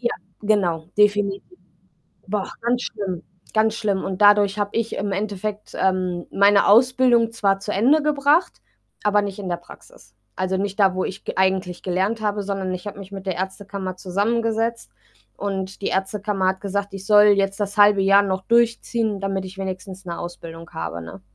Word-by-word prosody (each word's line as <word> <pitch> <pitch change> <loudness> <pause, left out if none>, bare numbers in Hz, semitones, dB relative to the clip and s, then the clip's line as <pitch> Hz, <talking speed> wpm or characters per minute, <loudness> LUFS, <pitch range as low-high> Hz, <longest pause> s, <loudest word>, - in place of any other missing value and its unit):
Ja, 240 -1 0 0.3
genau, 180 -7 +1
definitiv. 205 -1 +3 0.9
War 205 -1 -1
auch - - -13
ganz 240 +1 0
schlimm, 190 -5 -4 0.3
ganz 220 0 +3
schlimm 200 -4 -1
und 190 +1 -4
dadurch 205 0 +5
habe 205 0 -1
ich 230 -1 -1
im 200 0 -2
Endeffekt, 210 +1 -4
ähm, 185 -2 0
meine 200 0 +5
Ausbildung 240 0 +4
zwar 200 -3 +1
zu 205 +1 -4
Ende 270 +10 +3
gebracht, 300 +3 +2 0.4
aber 205 0 +3
nicht 200 0 -5
in 190 -2 -5
der 175 - -1
Praxis. - - -17 0.2
Also, 185 0 -1
nicht 200 +1 -3
da, 190 -2 +4
wo 185 - -1
ich 195 +1 -6
g - - -3
eigentlich 190 -1 0
gelernt 190 +5 -1
habe, 205 -1 -1
sondern 195 -2 -3
ich 180 - -8
habe 200 -1 -6
mich 195 0 -10
mit 195 0 -7
der 185 - -1
Ärztekammer 190 0 -5
zusammengesetzt 225 +4 -1 0.5
und 195 -1 -4
die - - -1
Ärztekammer 195 0 -1
hat 190 0 -1
gesagt, 200 0 -3
ich 195 0 -8
soll 210 0 +7
jetzt 195 -1 +3
das 205 +1 -2
1/2 205 -1 +6
Jahr 195 +1 +6
noch 190 -1 -2
durchziehen, 230 -1 +1
damit 195 -1 -2
ich 190 +1 -10
wenigstens 190 0 -6
'ne 170 -1 -5
Ausbildung 165 -1 -8
habe, 80 +1 -5
ne? 85 +3 -10
200 Hz, 180 wpm, -22 LUFS, 190-210 Hz, 0.9 s, soll